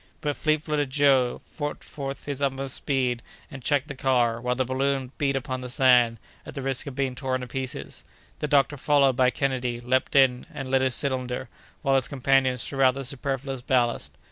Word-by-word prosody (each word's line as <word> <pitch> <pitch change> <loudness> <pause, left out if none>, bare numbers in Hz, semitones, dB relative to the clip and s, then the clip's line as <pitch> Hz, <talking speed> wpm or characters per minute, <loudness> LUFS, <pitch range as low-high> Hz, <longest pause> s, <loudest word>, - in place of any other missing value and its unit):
But 145 -1 -2
fleet 155 0 +1
footed 150 -3 -1
Joe 135 -3 +3 0.2
put 145 0 -3
forth 135 -1 -6
his 140 -1 -4
utmost 135 -1 -1
speed, 125 -4 0 0.3
and 135 -3 -8
checked 145 +2 +1
the 145 - -5
car, 120 -3 +1
while 125 0 0
the 130 +1 0
balloon 135 0 -1
beat 140 -1 +1
upon 130 -1 -3
the 125 - -6
sand, 125 -2 +4 0.3
at - - -10
the 140 - -4
risk 135 +2 -2
of 135 - -6
being 135 -2 -1
torn 130 0 -2
to 125 - -6
pieces. 130 0 -5 0.4
The 150 - -1
doctor, 145 0 +3
followed 140 -2 +3
by 125 0 +4
Kennedy, 125 -2 -1
leaped 130 +3 0
in, 130 -2 +4
and 135 -1 -6
lit 135 0 +3
his 130 -2 +2
cylinder, 130 -2 -1 0.3
while 135 -2 +2
his 130 -2 +2
companions 130 -2 +2
threw 135 -1 -3
out 130 -1 +5
the 135 - -4
superfluous 135 0 -3
ballast. 120 -2 0
135 Hz, 195 wpm, -26 LUFS, 125-140 Hz, 0.4 s, out